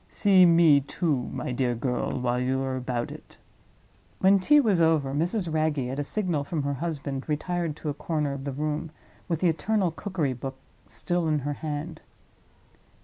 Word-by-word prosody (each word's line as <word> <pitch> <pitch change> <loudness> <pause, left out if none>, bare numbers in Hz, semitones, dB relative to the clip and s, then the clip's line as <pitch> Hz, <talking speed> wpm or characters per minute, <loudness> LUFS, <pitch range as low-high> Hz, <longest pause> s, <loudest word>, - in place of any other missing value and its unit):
See 190 -3 +5
me, 165 -4 +6
too, 145 -2 -1
my - - -4
dear 125 -1 0
girl, 125 +1 -2
while 125 0 0
you 130 +1 0
are 130 -1 -2
about 125 -2 -3
it." - - -12 0.8
When 195 +1 +5
tea 295 +10 +5
was 210 -10 +3
over, 155 -4 +2
Mrs. 170 +3 -1
Wragge, 155 -4 0
at 135 - -4
a - - 0
signal 175 -3 -1
from 150 0 -3
her 140 0 -1
husband, 140 -2 -4
retired 165 +1 -1
to 150 - -5
a - - -1
corner 150 -2 -2
of 135 -1 -6
the 140 - -3
room, 150 +3 -3 0.4
with 165 -3 -2
the 180 - +4
eternal 185 +3 +1
cookery 165 -6 -2
book 135 +2 -6 0.3
still 165 - -2
in 155 -2 +1
her 145 - -1
hand. 155 +2 -5
150 Hz, 180 wpm, -26 LUFS, 135-170 Hz, 0.8 s, me